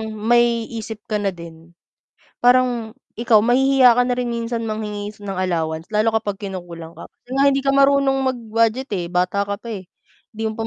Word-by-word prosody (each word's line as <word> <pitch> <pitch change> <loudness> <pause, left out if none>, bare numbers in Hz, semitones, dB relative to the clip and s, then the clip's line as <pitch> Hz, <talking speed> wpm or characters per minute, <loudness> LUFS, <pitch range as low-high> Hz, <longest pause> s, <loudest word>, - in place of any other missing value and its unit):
may 235 +1 +2
isip 220 -1 -7
ka 210 - +1
na 200 - -1
din, 165 0 -13 0.7
parang 245 -3 +3 0.2
ikaw 230 -2 +4
mahihiya 255 +1 +4
ka 245 - +4
na 250 - -1
rin 245 - -1
minsan 230 -1 -3
manghingi 210 -1 -5
ng 195 -2 -4
allowance, 165 -3 -2
lalo 215 +1 +1
kapag 210 -3 -2
kinukulang 170 -3 -8
ka. - - -12
Kasi 245 - -26
nga 275 - +2
hindi 275 0 +1
ka 275 - +2
marunong 275 -1 +3 0.2
mag-budget, 230 +2 -1
eh, 180 -3 -2
bata 180 +3 0
ka 200 - -2
pa, 230 +3 -12
eh. 190 -4 -8 0.5
Hindi 220 - -6
mo - - -5
pa 225 - -2
220 Hz, 185 wpm, -20 LUFS, 195-245 Hz, 0.7 s, ikaw